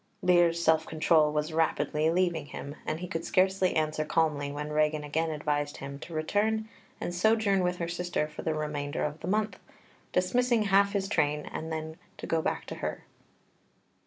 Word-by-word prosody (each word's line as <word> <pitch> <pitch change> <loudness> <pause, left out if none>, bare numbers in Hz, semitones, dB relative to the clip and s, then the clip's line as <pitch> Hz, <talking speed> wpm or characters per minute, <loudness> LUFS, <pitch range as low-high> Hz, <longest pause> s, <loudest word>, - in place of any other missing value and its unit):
Lear's 175 -2 +4
self 160 -1 +3
control 155 -1 +3
was 150 +1 -1
rapidly 160 -1 +1
leaving 170 -3 +1
him, 140 0 -7
and 155 +2 -2
he 180 - -4
could 165 -1 -3
scarcely 190 0 +2
answer 155 -1 +1
calmly 150 -3 0
when 150 +1 -5
Regan 150 0 +1
again 160 +3 -1
advised 145 -1 -2
him 140 0 -7
to 170 - -9
return 215 +7 0 0.3
and 175 - -3
sojourn 205 +1 +3
with 180 0 0
her 170 - -2
sister 175 -2 -1
for 150 - -8
the 160 -1 -1
remainder 150 -1 -2
of 150 +1 -3
the - - -6
month, 215 +2 0 0.5
dismissing 235 +5 +2
half 200 0 +4
his 195 -1 0
train, 150 -5 +1
and 160 +1 -6
then 160 0 -4 0.2
to - - -7
go 165 -1 +1
back - - -2
to - - -6
her. - - -3
160 Hz, 180 wpm, -29 LUFS, 150-180 Hz, 0.5 s, Lear's